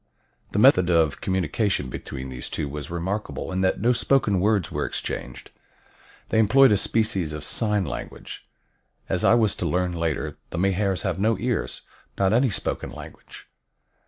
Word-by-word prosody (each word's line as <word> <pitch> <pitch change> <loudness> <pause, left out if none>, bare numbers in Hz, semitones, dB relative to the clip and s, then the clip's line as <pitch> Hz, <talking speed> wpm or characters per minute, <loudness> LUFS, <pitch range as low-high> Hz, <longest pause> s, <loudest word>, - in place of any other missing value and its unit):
The - - -1
method 90 -1 +5
of 80 -4 +2
communication 95 - 0
between 65 +1 -7
these 65 -1 -5
two 75 - -3
was 75 0 -6
remarkable 95 +5 -4
in 95 0 -1
that 95 - +1
no 120 +5 +3
spoken 115 -4 +2
words 100 -1 +1
were - - -2
exchanged. - - -5 0.8
They 110 - +2
employed 130 +5 +6
a 105 - +4
species 100 -7 0
of 75 -1 -6
sign 105 +1 0
language. 65 -4 -8 0.6
As 90 -2 0
I - - +6
was 110 -4 +3
to - - -2
learn 90 0 0
later, 85 -3 -2
the - - -6
Mahars 95 +1 +1
have 95 -3 -2
no 110 +1 +2
ears, 120 +2 -2 0.4
not 95 +1 +2
any 125 +3 +3
spoken 100 - -3
language. - - -11
95 Hz, 160 wpm, -24 LUFS, 85-110 Hz, 0.8 s, employed